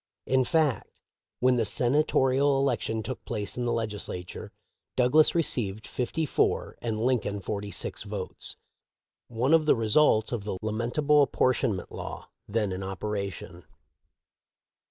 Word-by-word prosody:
In 130 0 +3
fact, 155 -3 +1 0.5
when 125 0 +4
the 115 - +2
Sena 125 +7 +3
torial 135 -1 +2
election 115 -4 0
took 120 +4 -6
place 105 -3 -4
in 125 - -2
the 120 - +1
Legislature, 105 -6 -4 0.4
Douglas 140 +7 +4
received 110 -10 -1
fifty 130 +6 -2
four - - 0
and 110 -2 -2
Lincoln 115 -4 0
forty 100 +1 -4
six - - -4
votes - - -5 0.4
— - - -65
one 135 +5 +4
of 160 -2 +4
the - - +6
results 110 0 +3
of 120 -5 -2
the 100 -2 -3
lamentable 120 +7 +2
appor 130 - +2
tionment 105 -9 -2
law - - -7 0.2
then 105 -1 0
in 95 +1 -4
operation. 95 -2 -5
115 Hz, 140 wpm, -28 LUFS, 105-130 Hz, 0.5 s, the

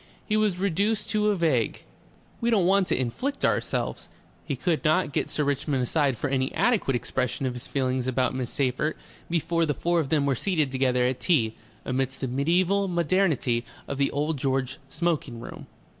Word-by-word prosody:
He 215 - 0
was 215 -4 +2
reduced 200 +4 0
to 210 0 +2
a 205 - +2
vague: 155 - 0 0.6
"We 235 - +1
don't 205 -6 +3
want 190 0 +4
to - - 0
inflict 250 - -1
ourselves - - -1 0.2
" - - -32
He - - -1
could 170 -4 0
not 155 -2 +2
get - - -1
Sir 150 - 0
Richmond 140 -1 0
aside 140 -1 +1
for 145 - -2
any 130 -1 0
adequate 215 - +2
expression 125 +2 -1
of 130 - -1
his 125 0 -7
feelings 130 -2 -1
about 130 0 +1
Miss 130 -2 -3
Seyffert, 140 +3 -1 0.3
before 170 0 +1
the 145 - 0
four 175 0 +1
of 150 -5 -1
them 150 -2 +2
were 140 - +2
seated 155 0 0
together 130 -1 +2
at 125 0 0
tea 120 -11 +2 0.3
amidst 130 +1 -1
the 135 - -2
mediaeval 175 +9 +2
modernity 170 -9 +1 0.2
of 140 - -4
the 140 - +3
Old 150 +2 -1
George 135 +1 -1
smoking 150 -7 -1
room. - - -9
145 Hz, 190 wpm, -26 LUFS, 130-175 Hz, 0.6 s, want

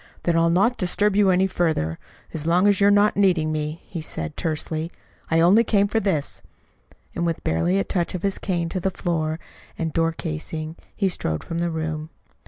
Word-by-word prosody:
"Then 170 - +1
I'll 165 0 +4
not 200 +8 +2
disturb 200 +2 +1
you 205 -1 +4
any 185 +1 +4
further 160 - 0 0.3
as 155 0 -4
long 175 +3 +4
as 205 0 +3
you're 200 - +6
not 205 +1 +4
needing 180 -6 +3
me," 155 +1 -3
he 170 - -6
said 80 - -5
tersely. 160 +1 -2 0.4
"I 165 - +3
only 195 +7 +6
came 205 -3 +2
for 225 +2 +1
this." 185 -9 -1 0.7
And 170 - -2
with 165 -1 -1
barely 85 +4 +1
a 100 - +2
touch 175 - -1
of 180 - -5
his 195 -1 0
cane 175 -3 -1
to 185 - -2
the 190 - 0
floor 160 -4 -2 0.4
and 165 -2 -2
door 165 0 +2
casing, 155 - -5 0.2
he 200 - +1
strode 80 - -2
from 165 - -4
the 170 0 0
room. 160 -1 -3
170 Hz, 195 wpm, -23 LUFS, 155-190 Hz, 0.7 s, you're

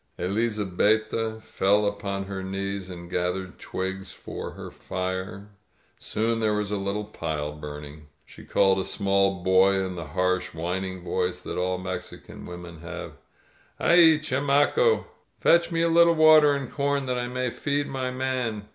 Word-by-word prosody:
Elizabetta 110 +2 0
fell 100 +2 +2
upon 100 -1 -2
her 95 -1 -5
knees 95 0 -4
and 85 -1 -8
gathered 90 +1 -2
twigs 95 0 -4
for - - -7
her - - -9
fire. 95 +2 -5 0.5
Soon 115 +1 -1
there 110 -1 +1
was 105 -1 -2
a 105 - 0
little 100 +2 -2
pile 75 -8 -4
burning. 75 0 -9 0.2
She - - -14
called 95 -1 +3
a - - 0
small 95 -2 +1
boy 95 +1 +5
in 95 -1 -1
the 85 -3 -6
harsh, 90 -2 0
whining 90 +2 -3
voice 90 0 -1
that - - -4
all 90 0 0
Mexican 90 0 -7
women 90 -2 -9
have, 85 +2 -7 0.7
"Aiel 170 -2 +6
chamaco! 145 - +2 0.3
Fetch 170 +1 +4
me 165 0 +1
a - - +3
lit 170 +1 +6
tle 170 - +4
water 155 -2 +7
and 140 -3 -4
com 140 -1 0
that 125 -1 -1
I 120 - -2
may 125 0 -2
feed 145 +3 -1
my 130 -1 -3
man!" 125 -5 -2
100 Hz, 155 wpm, -26 LUFS, 90-125 Hz, 0.7 s, water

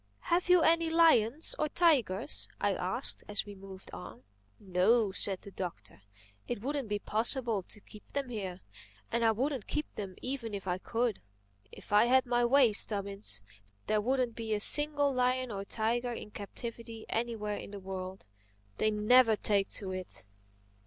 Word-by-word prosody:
"Have 355 +1 +1
you 360 -2 +6
any 330 0 +3
lions 320 -5 +5
or 305 - 0
tigers?" 275 - +2
I - - +1
asked - - -1
as 210 0 0
we 205 - -9
moved 195 -1 -12
on. 180 - -10 0.4
"No," 200 +3 +2
said 190 -1 +1
the 200 - -7
Doctor. 105 - -7 0.5
"It 245 - -3
wouldn't 275 -3 -3
be 205 - 0
possible 225 +1 +1
to 210 - -10
keep 210 0 -15
them 280 -2 -3
here—and 210 +2 -6
I 225 - +4
wouldn't 255 +1 -2
keep 300 - -2
them 195 -3 -7
even 250 -5 -4
if 195 -1 -7
I 180 0 -1
could. 230 +1 -2 0.5
If - - -10
I 210 +2 +6
had 260 +2 +3
my 240 0 +1
way, 245 -2 +4
Stubbins, 200 - +3 0.4
there 215 -1 +1
wouldn't 250 +1 0
be 220 -2 -2
a - - -2
single 290 +3 +2
lion 255 0 0
or 195 -1 -5
tiger 240 +3 -1
in 210 - -8
captivity 230 +2 -8
anywhere 220 -3 -3
in - - -8
the 200 0 -8
world. 190 0 -7 0.5
They 215 - +2
never 220 +2 +4
take 200 -2 +1
to 195 -2 -3
it. 185 - -3
225 Hz, 165 wpm, -31 LUFS, 200-255 Hz, 0.5 s, you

